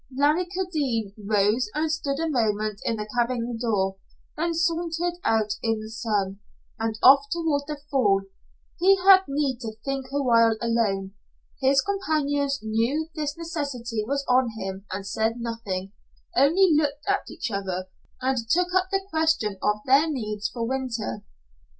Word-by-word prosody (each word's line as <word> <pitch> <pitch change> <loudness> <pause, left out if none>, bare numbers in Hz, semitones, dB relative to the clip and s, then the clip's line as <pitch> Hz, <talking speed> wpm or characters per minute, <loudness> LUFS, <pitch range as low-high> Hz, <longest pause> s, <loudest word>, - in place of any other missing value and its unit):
Larry 300 +6 +3
Kildene 295 - -2
rose 210 +3 +2
and 310 +1 0
stood 285 -3 -2
a 330 - 0
moment 215 -6 0
in 230 - +1
the 210 -1 -5
cabin 240 0 0
door, 195 -5 0 0.4
then 335 +2 -1
sauntered 340 +1 -1
out 215 -2 +2
in 225 -1 0
the 215 0 -8
sun, 205 -4 -2 0.4
and 225 -1 -2
off 275 +2 +7
toward 320 -4 0
the 300 -1 -4
fall. 200 -8 +3 0.6
He 385 +3 +5
had 385 -1 +8
need 275 -3 -1
to 225 -4 -5
think 275 -1 -2
a 285 0 0
while 230 -3 +4
alone. 210 -5 0 0.5
His 270 +1 +4
companions 290 -8 0
knew 235 +9 0
this 300 -1 -3
necessity 280 -9 -3
was 280 +5 -2
on 250 -1 +3
him, 195 -1 -6
and 195 +1 -4
said 220 +3 0
nothing 205 -5 -4 0.4
only 335 +8 +5
looked 295 -1 0
at 400 0 0
each - - -5
other, 190 -2 -3 0.3
and 260 0 0
took 360 +4 +2
up 370 0 +3
the 390 -1 -1
question 315 - 0
of 210 0 +1
their 280 +5 +4
needs 215 -7 -3
for 235 - -7
the - - -3
winter. 250 - -3
255 Hz, 155 wpm, -25 LUFS, 220-310 Hz, 0.6 s, had